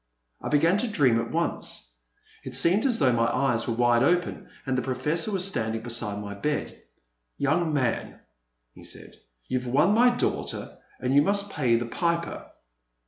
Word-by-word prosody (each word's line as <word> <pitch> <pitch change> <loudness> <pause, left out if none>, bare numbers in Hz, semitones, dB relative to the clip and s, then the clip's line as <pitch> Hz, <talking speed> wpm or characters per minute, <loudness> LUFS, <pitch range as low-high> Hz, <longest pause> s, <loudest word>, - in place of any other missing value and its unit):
I - - -4
began 165 +6 +3
to 245 - 0
dream 135 - +3
at - - -5
once. - - -2 0.5
It - - -4
seemed 200 +10 +4
as 245 -3 +1
though 130 - +3
my 115 -1 +2
eyes 120 -3 +1
were 115 - -1
wide 120 0 +3
open 175 +5 0 0.2
and 130 -2 -1
the 125 - 0
Professor 150 - 0
was 190 -2 +1
standing 115 - -1
beside 115 -3 -2
my 100 0 -6
bed. 150 +9 -3 0.6
"Young 155 +4 +1
man," 130 -6 -1 0.5
he - - -15
said, - - -5 0.3
"you've 125 -1 -2
won 150 +10 +3
my 245 +3 +5
daughter 245 0 -3 0.2
and 130 +1 -1
you 140 - +6
must 200 +4 0
pay 125 -9 +2
the 120 +1 0
piper 170 +7 -2
140 Hz, 170 wpm, -26 LUFS, 120-175 Hz, 0.6 s, you